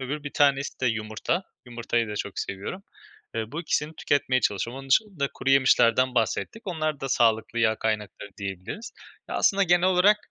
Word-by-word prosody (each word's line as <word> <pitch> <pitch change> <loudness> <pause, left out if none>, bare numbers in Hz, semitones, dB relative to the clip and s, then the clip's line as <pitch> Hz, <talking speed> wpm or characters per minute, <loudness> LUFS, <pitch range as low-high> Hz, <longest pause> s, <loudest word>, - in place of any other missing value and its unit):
Öbür 145 +3 -4
bir 145 - -4
tanesi 140 -1 +2
de 130 - +1
yumurta. 115 - -1 0.2
Yumurtayı 120 -1 -1
da 105 - -4
çok 100 -1 -4
seviyorum. 100 - -5 0.5
Eee, 110 +2 -4
bu 165 - -3
2'sini 155 -2 -1
tüketmeye 130 -3 +1
çalışıyorum. 115 +6 -1
Onun 135 - -12
dışında 175 -7 +2
kuruyemişlerden 130 -2 +3
bahsettik. 120 - -1
Onlar 155 -5 -2
da 135 - -3
sağlıklı 115 -1 +2
yağ 110 -1 +3
kaynakları 105 -2 -3
diyebiliriz. 100 - -6 0.4
Ya, - - -5
aslında 200 0 +3
genel 175 0 +4
olarak, 190 +3 +5
130 Hz, 165 wpm, -26 LUFS, 110-155 Hz, 0.5 s, olarak